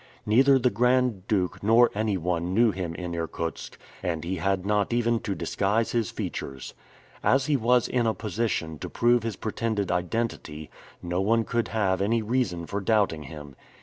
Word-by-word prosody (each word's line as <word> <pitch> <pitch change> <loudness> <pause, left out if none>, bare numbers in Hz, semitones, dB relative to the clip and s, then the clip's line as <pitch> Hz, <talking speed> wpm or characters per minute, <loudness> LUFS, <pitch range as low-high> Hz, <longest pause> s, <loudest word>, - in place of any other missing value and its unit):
Neither 135 +5 +5
the 125 -1 +2
Grand 125 -3 +1
Duke 95 -4 0
nor 115 +3 +5
anyone 90 -4 -1
knew 115 0 +5
him 90 -3 -4
in 90 0 -5
Irkutsk, 85 0 -4 0.2
and 85 -4 -2
he 90 +2 -3
had 95 +2 0
not 105 0 +1
even 120 -1 +1
to 100 -3 -3
disguise 105 +7 0
his 115 -4 0
features. 70 -2 -6 0.5
As 135 0 +3
he 150 -1 +2
was 125 -1 +3
in 120 -2 +1
a 110 - +1
position 105 -7 -2
to - - -6
prove 120 0 +3
his 115 -1 -3
pretended 110 -2 -2
identity, 90 -4 -3 0.3
no 90 +1 -1
one 115 +3 +2
could 115 +1 -1
have 95 -4 0
any 110 +3 +1
reason 110 -7 -1
for 100 +4 -3
doubting 100 -8 +1
him. 75 -1 -10
105 Hz, 170 wpm, -26 LUFS, 90-115 Hz, 0.5 s, Neither